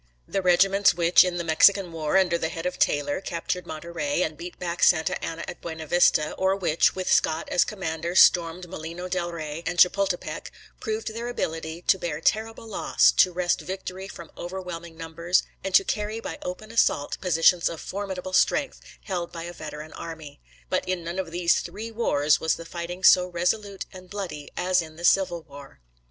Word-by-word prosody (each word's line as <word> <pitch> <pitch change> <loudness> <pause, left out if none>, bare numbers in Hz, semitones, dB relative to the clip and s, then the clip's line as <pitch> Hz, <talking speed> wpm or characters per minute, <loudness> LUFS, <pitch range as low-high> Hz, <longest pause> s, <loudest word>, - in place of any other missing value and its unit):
The 195 - -1
regiments 190 +1 +4
which, 170 0 +6
in 180 -1 -2
the 170 - -2
Mexican 175 +3 +4
war, 160 +1 0
under 185 -3 +3
the 160 -1 -1
lead 165 - -6
of 180 - -3
Taylor, 145 +3 +1
captured 180 0 -4
Monterey, 170 - -2
and 155 - -3
beat 175 +3 -9
back 175 -1 -4
Santa 160 - +3
Anna 165 0 -4
at - - -8
Buena 160 -1 -6
Vista, 155 -2 +3
or 190 0 +2
which, 175 -5 +2
with 185 -1 -4
Scott 160 - +1
as 175 - +4
commander, 170 -4 -4
stormed 175 0 +4
Molino 170 +1 -7
Del 180 -1 -2
Rey 155 -1 -5
and 175 +1 -2
Chapultepec, 180 -3 +2 0.3
proved 220 0 -3
their 230 +1 -5
ability 165 -6 -4
to 190 - +3
bear 155 -4 -3
terrible 220 +6 -1
loss, 220 - +3
to 185 - +4
wrest 175 0 0
victory 190 0 -6
from 170 -4 -11
overwhelming 175 -2 -7
numbers, 170 +2 0 0.2
and 195 -1 -1
to 195 - +7
carry 210 +2 -3
by - - -7
open 215 +5 -6
assault 185 -10 +1
positions 175 -1 +3
of 165 - -7
formidable 190 -2 -5
strength 280 +8 +2 0.2
held 180 -4 -4
by 165 -1 -7
a 175 +1 -7
veteran 155 -1 -8
army. 160 - -9 0.3
But - - -1
in 185 -2 -1
none 170 +3 -4
of 185 -3 -3
these 175 0 +2
three 225 +2 -7
wars 155 -10 +2
was 160 - +1
the 165 - -9
fighting 175 +2 -6
so 180 -1 +7
resolute 195 +3 -2
and 185 -1 -12
bloody 175 -8 -6
as 185 0 +2
in 160 -1 -10
the 170 +2 -5
Civil 175 -3 +3
War. 140 - -13
175 Hz, 185 wpm, -25 LUFS, 165-190 Hz, 0.3 s, to